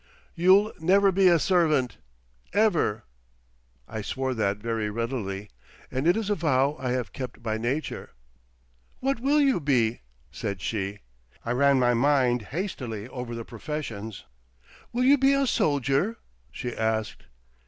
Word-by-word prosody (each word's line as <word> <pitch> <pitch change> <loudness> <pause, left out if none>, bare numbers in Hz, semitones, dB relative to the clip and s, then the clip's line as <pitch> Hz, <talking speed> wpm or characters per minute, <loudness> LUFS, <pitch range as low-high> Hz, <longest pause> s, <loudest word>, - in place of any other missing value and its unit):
"You'll 190 +5 +4
never 195 +4 +4
be 190 0 +4
a 175 -1 +6
servant—ever!" 125 - 0 0.8
I 110 - -5
swore 130 +5 -2
that 105 -4 0
very 110 -1 -2
readily, 105 -3 -4 0.4
and 130 +4 -1
it 175 - +4
is 215 -2 -2
a - - +5
vow 145 -5 +1
I 130 - -2
have 125 -6 -3
kept 125 -3 -7
by 110 -1 -2
nature. 130 +7 -3 0.9
"What 270 -2 0
will 280 +4 +2
you 275 -8 +3
be?" 125 -7 +1 0.3
said 100 -2 -4
she. 100 0 -3 0.4
I 115 - -1
ran 140 +2 +4
my 125 -1 +3
mind 125 -1 +3
hastily 125 - -4
over 125 -2 -6
the 115 -1 -6
professions. 115 -5 -6 0.7
"Will 245 +1 0
you 275 +2 +5
be 270 +1 +4
a 275 0 +2
soldier?" 145 - +1 0.3
she 120 -1 -5
asked. 110 -3 -2
130 Hz, 140 wpm, -26 LUFS, 110-175 Hz, 0.9 s, a